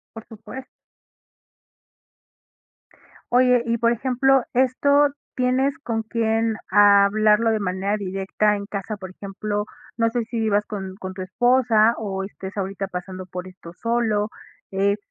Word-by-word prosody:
Por 225 - -9
supuesto. 250 +4 -10 2.6
Oye, 250 -1 +4
y 235 0 0
por 235 0 +3
ejemplo, 260 +2 +2
¿esto 280 +3 +3 0.3
tienes 260 +2 +1
con 225 -5 -3
quién 225 0 0
hablarlo 210 +2 +5
de 220 - +1
manera 195 +2 -1
directa 195 +2 0
en 200 0 -6
casa? 205 +1 -5
Por 190 -2 -8
ejemplo, 205 +2 -4 0.3
no 230 -1 +2
sé 240 -1 -1
si 230 +1 -4
vivas 210 -2 +2
con 190 -2 -6
con 190 -2 -7
tu 185 - -5
esposa 230 +2 +3
o 195 -3 -3
estés 195 0 -8
ahorita 195 0 -3
pasando 185 0 -7
por 180 0 -7
esto 180 -2 -12
solo, 225 0 0 0.4
eh, 200 +1 +1
215 Hz, 135 wpm, -23 LUFS, 195-235 Hz, 2.6 s, hablarlo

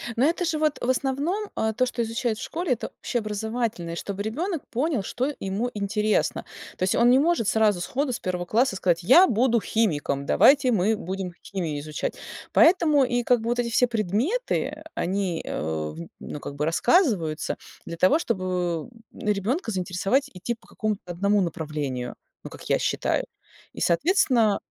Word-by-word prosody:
Но 250 - +3
это 345 +3 +1
же 320 -2 -1
вот, 305 -1 +1
в 245 - -1
основном, 285 +11 -1
э, 220 0 0
то, 255 - +2
что 245 -1 -3
изучают 230 0 -1
в - - -5
школе- 340 -2 -3
это 235 - -5
общеобразовательные, 215 -5 -2
чтобы 200 +3 -4
ребенок 315 - -3
понял, 260 -2 0
что 260 +8 -2
ему 195 +6 -2
интересно. 210 +1 0 0.3
То - - -2
есть 185 - +2
он 235 +1 +5
не 255 +2 +6
может 320 - +2
сразу 215 -4 +3
сходу 265 +7 -1
с 235 - -3
первого 180 -1 -3
класса 225 +4 +2
сказать: 175 -2 +1
"Я 335 - +7
буду 235 - +2
химиком, 150 -11 0
давайте 270 - +5
мы 215 0 +2
будем 190 -1 -5
химию 165 -7 -3
изучать". 150 +1 -4 0.4
Поэтому 320 -4 +5
и 245 -1 0
как 245 -1 +3
бы 230 - -3
вот 240 0 0
эти 240 -1 0
все 245 +2 +3
предметы- 245 - -1
они, 185 -2 -1
э, - - -3
в 75 0 -3 0.2
ну 150 - -7
как 140 - -7
бы 150 +1 -1
рассказываются 170 - +2 0.3
для 170 - -6
того, 185 - +4
чтобы 180 - -2 0.2
ребёнка 215 - -1
заинтересовать, 195 +9 0
идти 190 +6 -3
по 225 - -24
какому-то 215 -2 -3
одному 200 +4 +2
направлению, 150 -7 -3 0.3
ну, - - -7
как - - -12
я - - +3
считаю. - - 0 0.5
И, - - -8
соответственно, 235 - +3
220 Hz, 170 wpm, -25 LUFS, 180-260 Hz, 0.5 s, Я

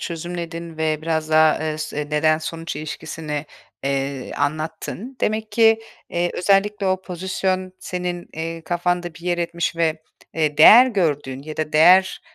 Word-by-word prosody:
çözümledin 170 -1 -6
ve 155 -1 -1
biraz 160 -1 -1
daha, 155 0 +5
eee, 155 -1 -3
s 150 -1 -3
neden-sonuç 155 +1 0
ilişkisini, 150 0 -5 0.4
eee, 135 -1 -2
anlattın. 155 - -4
Demek 215 0 -1
ki, 225 0 +4 0.3
eee, 175 0 0
özellikle 200 +2 +2
o 185 0 0
pozisyon 185 +1 -2
senin, 180 -1 -4
eee, 165 +1 -5
kafanda 175 0 -1
bir 170 - -14
yer 175 0 -1
etmiş 170 0 -2
ve, 160 -1 0 0.3
eee, 155 -2 0
değer 235 +11 +9
gördüğün 145 - -1
ya 155 +1 -8
da 155 -1 -3
değer 180 +5 +5
165 Hz, 140 wpm, -21 LUFS, 155-180 Hz, 0.4 s, değer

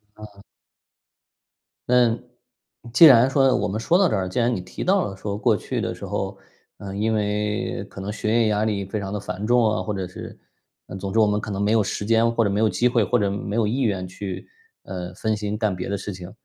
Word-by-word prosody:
啊。 105 -2 -13 1.5
嗯， 120 -2 +3 0.7
既 165 - +9
然 130 -2 +8
说 135 -1 +3
我 - - -1
们 105 +3 -3
说 170 +10 +2
到 195 - +4
这 - - 0
儿， 95 -2 -2
既 110 - -2
然 120 0 +2
你 90 - -4
提 90 - -7
到 190 0 +2
了， 95 - -7
说 100 0 -4
过 110 -2 +2
去 - - -4
的 - - -3
时 - - -8
候， - - -3 0.4
呃， 100 -1 -7
因 110 +2 0
为 105 +1 -1
可 - - -11
能 100 +2 -4
学 110 0 -2
业 115 -1 +3
压 105 0 +1
力 100 -3 -1
非 105 +3 -4
常 95 -1 -5
地 105 - -3
繁 100 +1 -5
重 120 0 +4
啊， 105 - -1
或 105 - -3
者 95 -2 -3
是 90 - -10 0.5
呃， - - -8
总 95 0 -5
之， 115 - -2
我 110 - +6
们 105 0 0
可 110 - -6
能 100 - -3
没 105 - +1
有 110 -1 +3
时 100 - -4
间， 115 +1 +3
或 115 -1 +2
者 100 - +1
没 100 - 0
有 110 0 +3
机 110 +6 +2
会， 120 -2 +2
或 95 - +1
者 100 -1 +1
没 100 +1 -4
有 115 - +2
意 130 +5 -1
愿 95 -6 -1
去， 95 +1 -7 0.4
呃， 90 -1 -6
分 110 +2 -1
心 105 0 -3
干 105 -3 0
别 90 +1 -5
的 100 - -1
事 105 - -6
情。 90 0 -9
105 Hz, 265 characters per minute, -23 LUFS, 100-115 Hz, 1.5 s, 既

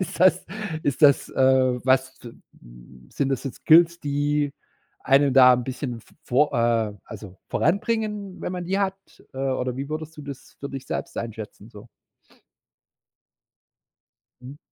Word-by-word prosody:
ist 185 - -4
das 185 0 +4 0.4
ist 140 +1 -2
das, 140 -2 +5
äh, 130 -1 +3
was 130 0 +2
zim 120 - -11 0.2
m - - -17
sind 140 - -1
das 135 -1 -2
jetzt 135 - -5
Skills, 170 +1 +6
die 145 0 -1 0.5
einen 140 0 +3
da 125 -1 +8
'n 125 -1 -3
bisschen 125 -2 -5
v - - -24
vor 140 +4 +2
äh, 115 -3 +1
also 95 -3 -10
voranbringen, 210 +1 -1
wenn - - -4
man 180 -1 -4
die 195 +3 -1
hat? 195 -1 0 0.4
Äh, 130 - -7
oder 130 -2 -2
wie 140 +2 -5
würdest 155 +1 -6
du 150 - -9
das 140 -2 -10
für 140 - -6
dich 135 -1 -7
selbst - - -5
einschätzen 110 -2 -7
so? 105 +2 -13 2.5
Mhm. 130 +3 -10
135 Hz, 155 wpm, -24 LUFS, 125-155 Hz, 2.5 s, da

